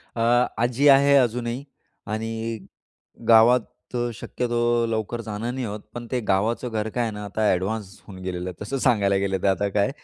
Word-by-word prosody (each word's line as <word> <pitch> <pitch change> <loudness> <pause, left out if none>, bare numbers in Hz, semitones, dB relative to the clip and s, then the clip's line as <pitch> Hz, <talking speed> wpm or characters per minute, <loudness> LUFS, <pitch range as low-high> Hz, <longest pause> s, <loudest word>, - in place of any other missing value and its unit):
अ, - - -5 0.4
आजी 125 +4 +2
आहे 140 +1 +6
अजूनही 120 0 0 0.5
आणि 115 +1 -3 0.7
गावात 115 +2 +7 0.3
अ, 120 -1 0
शक्यतो 120 0 0
लवकर 115 +1 -2
जाणं 110 +3 -4
नाही 130 -1 -3
होत, 105 0 -5
पण 120 0 -6
ते 125 - 0
गावाचं 110 +6 +1
घर 110 -1 -2
काय 120 - +1
आहे 115 -2 -2
ना, 105 0 -7
आता 100 +2 -3
ॲडव्हान्स 95 +2 -2
होऊन 95 -3 -10
गेलेलं 90 0 -4
आहे. 90 - -14
तसं 135 +6 -3
सांगायला 105 -7 +2
गेलं 95 0 0
तर 100 - +3
आता 100 +2 +1
काय. 100 +4 +1
115 Hz, 180 wpm, -24 LUFS, 100-120 Hz, 0.7 s, गावात